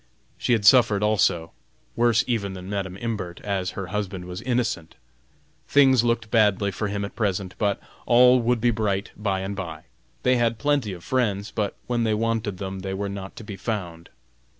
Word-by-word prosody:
She 125 - +1
had 110 -3 +1
suffered 110 -3 +6
also, 90 -6 +2 0.4
worse 120 0 +3
even 105 -6 -1
than 90 -1 -8
Madam 95 -2 -3
Imbert, 100 -6 -4
as 95 -3 -2
her 100 - -3
husband 95 -3 -3
was 90 +2 -6
innocent. 120 -9 -1 0.7
Things 135 -4 +5
looked 115 -2 0
bad 105 -4 +4
for 105 - -2
him 100 0 -2
at 100 - -9
present, 95 -4 -1
but 100 -2 +1 0.3
all 125 +1 +6
would 120 0 +1
be 120 +1 +3
bright 105 -3 -1
by 100 -3 -1
and 95 +1 -4
by. 85 -5 -6 0.4
They 125 0 +4
had 115 -1 +1
plenty 140 -3 +1
of 85 -2 -10
friends, 105 -6 0
but 105 -3 -2
when 120 -1 0
they 110 -1 +1
wanted 110 -3 -1
them, 95 0 -5
they 95 0 -4
were 100 +1 -3
not 100 -1 -7
to - - -9
be 105 -2 -7
found. 90 -6 -4
105 Hz, 185 wpm, -24 LUFS, 95-115 Hz, 0.7 s, suffered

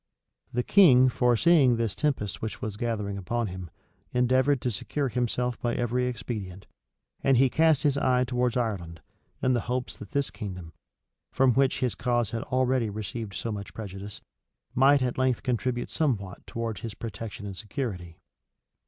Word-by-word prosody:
The 125 +1 0
king, 130 -10 +6
foreseeing 125 +3 +4
this 115 -3 -1
tempest 135 -9 -1
which 110 - -4
was 110 -2 -4
gathering 105 -3 -2
upon 115 +5 -1
him, 90 -2 -7 0.4
endeavored 130 +3 +3
to 125 - 0
secure 140 +6 -2
himself 125 0 -1
by 120 -1 0
every 125 +1 0
expedient; 105 -6 -5 0.6
and 135 -2 +4
he 130 0 +4
cast 160 -3 +3
his 140 -2 +2
eye 125 -2 +3
towards 125 0 0
Ireland, 90 -9 -3 0.4
in 130 - +3
hopes 125 +1 -2
that 105 - -10
this 140 +3 -1
kingdom, 90 -6 -7 0.6
from 130 -2 +4
which 135 +1 +2
his 125 -3 +1
cause 120 -2 0
had 115 - -2
already 130 -2 +1
received 105 0 -5
so 115 - -3
much 100 -1 -6
prejudice, 100 -1 -7 0.5
might 135 +1 +5
at 125 0 -2
length 130 -2 +1
contribute 125 -1 -1
somewhat 105 - -2
towards 115 -2 -4
his 115 -4 -6
protection 115 -1 -7
and 100 -1 -6
security. 95 - -5
120 Hz, 155 wpm, -27 LUFS, 105-130 Hz, 0.6 s, king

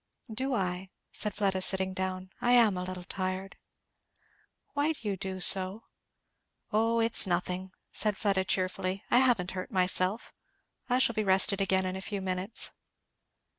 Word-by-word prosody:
"Do 260 +3 -1
I?" 185 -2 -2 0.2
said 210 -2 0
Fleda, 195 -2 0
sitting 190 0 +1
down. 185 0 -4
"I 245 - +3
am 230 -5 +5
a 180 - -3
little 180 0 -6
tired!" 185 +1 -4 1.2
"Why 295 +2 +1
do 235 -8 -8
you 200 - 0
do 190 0 -5
so?" 190 +4 +3 0.9
"O 225 +2 +2
it's 225 -3 +6
nothing" 180 +1 -2 0.2
said 210 -3 0
Fleda 195 -2 +1
cheerfully; 185 +1 -1
"I 245 - +6
haven't 235 -9 +2
hurt 185 +6 -6
myself. 185 +2 0 0.6
I 250 - +3
shall 260 -2 +2
be 215 - -1
rested 195 0 +3
again 190 -1 +2
in 185 0 -3
a 190 - -5
few 200 +1 -4
minutes." 190 +3 -2
190 Hz, 155 wpm, -29 LUFS, 185-215 Hz, 1.2 s, it's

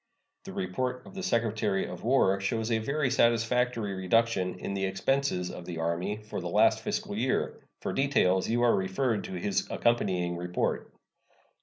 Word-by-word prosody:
The - - -7
report 125 +7 -3
of - - -12
the 190 - -5
Secretary 110 - 0
of - - -8
War 115 -6 +3
shows 110 +3 -1
a 110 - +2
very 140 +4 0
satisfactory 115 -2 +2
reduction 95 -1 +1
in 100 - -4
the 95 0 -1
expenses 95 -1 0
of 90 - -8
the 85 - -5
Army 85 +5 -1
for 105 - -5
the - - -4
last - - +4
fiscal 100 - -3
year. 125 +4 0 0.2
For - - -2
details 115 -10 +2
you 120 +1 +2
are 120 - +5
referred 100 +4 0
to - - -7
his 95 +2 -1
accompanying 90 -7 +1
report. 90 +1 -2
105 Hz, 165 wpm, -29 LUFS, 95-120 Hz, 0.2 s, are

